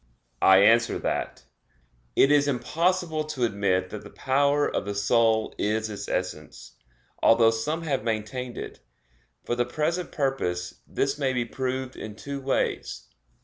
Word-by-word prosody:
I 95 +1 +7
answer 115 +2 +4
that, - - -3 0.7
It 135 - +5
is 145 -1 +4
impossible 160 +5 0
to 145 -5 -3
admit 100 -4 0
that 105 - -7
the - - -11
power 140 +2 +1
of - - -2
the 100 0 -4
soul 110 +1 +2
is 110 +1 0
its 100 -1 -6
essence, 75 -9 -4 0.5
although 115 0 +5
some 150 +9 -2
have 140 -7 -1
maintained 115 +3 -3
it. - - -7 0.7
For - - -1
the 120 0 +1
present 155 +8 -2
purpose 90 - -2
this 140 +2 -1
may 135 -2 +1
be 125 -1 0
proved 130 +1 -3
in 105 -1 -8
two 140 +4 -6
ways. 135 0 -2
120 Hz, 145 wpm, -26 LUFS, 105-140 Hz, 0.7 s, I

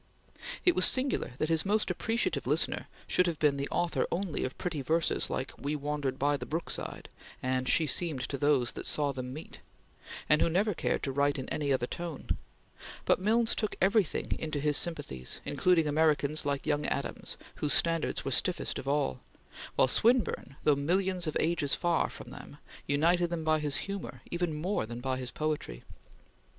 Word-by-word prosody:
It 355 - +6
was - - +7
singular 260 - +2
that 155 - -1
his 160 -2 +3
most 210 -1 +1
appreciative 225 +6 -1
listener - - +1 0.2
should 180 - +2
have 165 -2 -1
been 145 -2 +2
the 140 +1 -3
author 175 -1 0
only 180 -1 -1
of 130 - -4
pretty 170 -6 -3
verses 160 +5 0
like 130 - -3
"We 145 +2 -2
wandered 145 -2 -2
by 145 +1 +2
the - - -7
brook 165 +3 -3
side," - - -5 0.4
and 130 0 0
"She 160 - +4
seemed 155 -1 0
to 140 +2 -3
those 145 -5 +3
that - - -4
saw 145 -2 +1
them 130 -1 -5
meet"; 155 +5 -9 0.7
and 150 - +4
who - - +4
never 200 +5 +2
cared - - -1
to 135 - -1
write 140 +1 +1
in 130 - -5
any 145 -2 -1
other 130 -2 +2
tone; 170 +2 -6 0.8
but - - +3
Milnes 225 +3 +2
took 215 - -2
everything 195 -2 +2
into 155 -2 -2
his 150 0 +2
sympathies, 140 - -1
including 180 -3 +3
Americans 150 -1 +2
like 140 -1 -1
young 150 -1 0
Adams 140 - -3 0.2
whose 150 - +1
standards 165 -1 +1
were - - -1
stiffest - - 0
of 135 - -8
all, 140 - 0 0.6
while - - +5
Swinburne, 225 - +2
though 150 - +5
millions 180 +4 0
of 155 - 0
ages 155 -4 +1
far 175 -2 +1
from - - -10
them, - - -11 0.3
united 170 +5 +3
them 170 -2 -3
by 155 0 +3
his 150 -2 -1
humor 200 -1 -6
even 175 -1 0
more 155 - -1
than 120 +1 -6
by 130 +1 -2
his 130 -1 -5
poetry. 150 - -3
150 Hz, 185 wpm, -30 LUFS, 140-175 Hz, 0.8 s, was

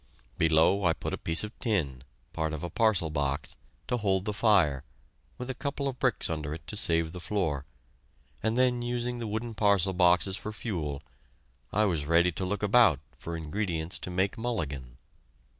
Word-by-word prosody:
Below, 80 +5 +4
I 80 - +4
put - - -5
a - - -1
piece 80 - +3
of 105 - -5
tin 75 - -1 0.3
part 80 -1 -1
of 80 +1 -5
a 85 - -4
parcel 100 -8 +2
box 70 -1 -2 0.3
to 125 - 0
hold 95 -3 +1
the 105 - -1
fire, 95 - +3 0.5
with 125 - -6
a 130 - -2
couple 140 +2 -3
of 130 -2 -4
bricks 125 -4 +2
under 75 -2 -3
it 80 0 -11
to - - -6
save 85 -5 +2
the 90 - -7
floor, 80 -8 -1 0.8
and 110 +2 0
then, 125 -1 +3
using 120 0 -2
the 115 - -4
wooden 110 +2 -3
parcel 100 -3 +3
boxes 90 +1 +4
for 105 - -6
fuel, 80 - -4 0.7
I 105 +2 +3
was 85 -7 0
ready 85 +2 +4
to 95 +3 -3
look 105 +3 -2
about 105 - +5 0.2
for 85 0 -5
ingredients 80 0 -2
to - - -5
make 95 +4 0
"mulligan." 70 - -3
95 Hz, 180 wpm, -29 LUFS, 80-110 Hz, 0.8 s, about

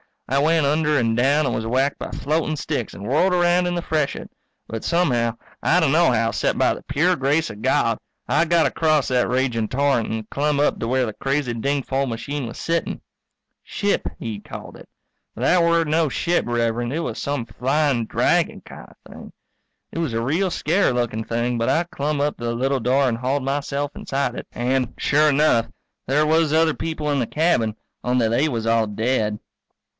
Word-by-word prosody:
I 135 +2 +1
went 160 +1 +3
under 150 +1 +2
and 115 -3 +1
down, 140 +5 +3
and - - 0
was 110 0 -2
whacked 135 +4 0
by - - -5
floating 155 +1 -1
sticks 145 -5 -3
and 100 - -9
whirled 155 - +2
around 175 0 +3
in 175 - -1
the 175 - -1
freshet. 155 -4 -2 0.3
But 115 -1 -6
somehow, 125 -10 +1 0.3
I 175 - +3
d'no 160 +2 +4
how 115 -1 +1
except - - -1
by - - +3
the - - -9
pure 170 +6 +1
grace 145 +4 +1
of 105 0 -9
God, - - +1 0.3
I 170 - +3
got 170 0 +3
across 155 -3 +1
that 125 -1 +2
raging 125 -3 0
torrent 135 -3 +1
and 110 -1 -4
clumb 145 0 0
up 145 - +1
to 115 - -2
where 130 +1 +1
the 110 - -5
crazy 135 -1 -1
dingfol 135 +2 -1
machine 125 +3 -4
was 115 - -8
sitting. 165 0 -2 0.6
Ship, 205 0 -1
he'd 105 -3 -6
called - - -9
it. - - -14 0.5
But - - -8
that 180 - +4
were 170 0 +3
no 160 +1 +1
ship, 175 +5 0
Rev'rend, 120 +1 -1
it 165 - -1
was 165 - -4
some 140 -5 -2
flying 130 +2 0
dragon - - +1
kind - - -12 0.2
of - - -14
thing. - - -11 0.6
It - - -5
was 160 -8 -1
a 115 - 0
real 170 +10 +1
scarey 170 -2 +1
lookin' 115 -2 -2
thing 120 +1 -1
but 115 - 0
I 170 - +2
clumb 150 -3 -2
up 145 +1 0
to 120 - -6
the 115 0 -1
little 135 +3 0
door 130 +4 +2
and 115 -2 0
hauled 130 +3 -1
myself 140 +1 -2
inside 140 +1 -2
it. - - -7
And, 125 0 -1
sure 150 +1 +3
enough, 140 -6 +3 0.4
there 145 +4 +2
was 160 0 +2
other 160 0 +3
people 155 -2 -3
in 140 - +1
the 120 - -1
cabin, 150 -10 +1 0.3
only 125 -2 +1
they 130 +7 +2
was 115 -6 -3
all 115 -1 +2
dead. 110 0 -1
140 Hz, 200 wpm, -22 LUFS, 120-155 Hz, 0.6 s, d'no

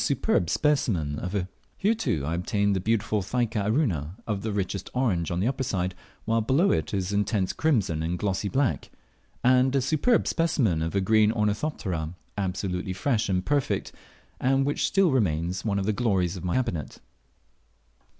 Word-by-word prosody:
Here, 210 +3 +2
too, 85 - -1
I 80 - -2
obtained 100 +3 0
the - - 0
beautiful 105 +1 0
Thyca 110 0 -1
aruna, 100 - 0
of 105 -3 -2
the 110 +1 -3
richest 100 -1 -3
orange 100 -11 +1
on 85 - -1
the 100 - +1
upper 135 +1 -1
side; 95 -8 -1 0.3
while 115 0 +2
below 135 - +3
it 80 - 0
is 95 -1 -2
intense 100 -1 0
crimson 105 - +1
and 85 +2 -1
glossy 100 +1 -1
black; 135 +1 0 0.5
and 130 +1 +4
a - - +4
superb 155 - +2
specimen 130 - +1
of 80 +4 -2
a 100 - +2
green 110 +2 +4
Ornithoptera, 105 - -2 0.2
absolutely 95 -1 -2
fresh 110 +3 0
and 90 -1 0
perfect, 145 +1 0 0.5
and 135 +1 +2
which 145 - 0
still 195 -4 +3
remains 90 -7 0
one 100 -3 0
of 100 - -1
the 110 - +1
glories 100 -6 +1
of 90 - -7
my 90 - -1
cabinet. 115 - -2
105 Hz, 160 wpm, -26 LUFS, 90-125 Hz, 0.5 s, and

